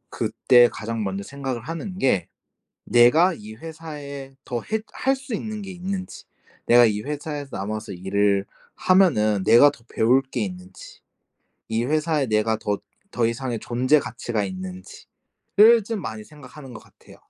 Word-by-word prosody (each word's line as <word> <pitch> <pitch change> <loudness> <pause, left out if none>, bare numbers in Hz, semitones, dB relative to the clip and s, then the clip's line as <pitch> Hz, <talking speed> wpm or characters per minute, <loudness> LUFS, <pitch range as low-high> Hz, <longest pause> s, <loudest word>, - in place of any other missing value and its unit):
그때 120 -1 +4
가장 115 0 -4
먼저 100 -1 -3
생각을 135 -1 -5
하는 165 - -6
게 125 - +1 0.6
'내가 150 +10 +5
이 110 -6 -10
회사에 145 -2 -9
더 120 -2 -3
했 220 -1 -3
할 270 +1 +1
수 265 -2 -8
있는 215 0 -5
게 195 - -7
있는지. 185 +1 -6 0.4
내가 120 0 +7
이 105 -2 0
회사에서 145 +1 -5
남아서 105 +2 -5
일을 100 +2 0 0.3
하면은 110 - +3
내가 115 +8 +7
더 140 -5 -14
배울 125 +4 +4
게 130 -2 -6
있는지. 90 -1 -9 0.7
이 115 +1 -1
회사에 155 +1 0
내가 110 0 +1
더 105 -2 -2 0.4
더 120 -2 +2
이상의 120 0 -3
존재 130 +5 +2
가치가 115 -3 -3
있는지.'를 95 - 0
좀 220 0 -4
많이 110 -7 -6
생각하는 140 -1 -13
것 115 - -10
같아요. - - -19
125 Hz, 290 characters per minute, -23 LUFS, 110-155 Hz, 0.7 s, 내가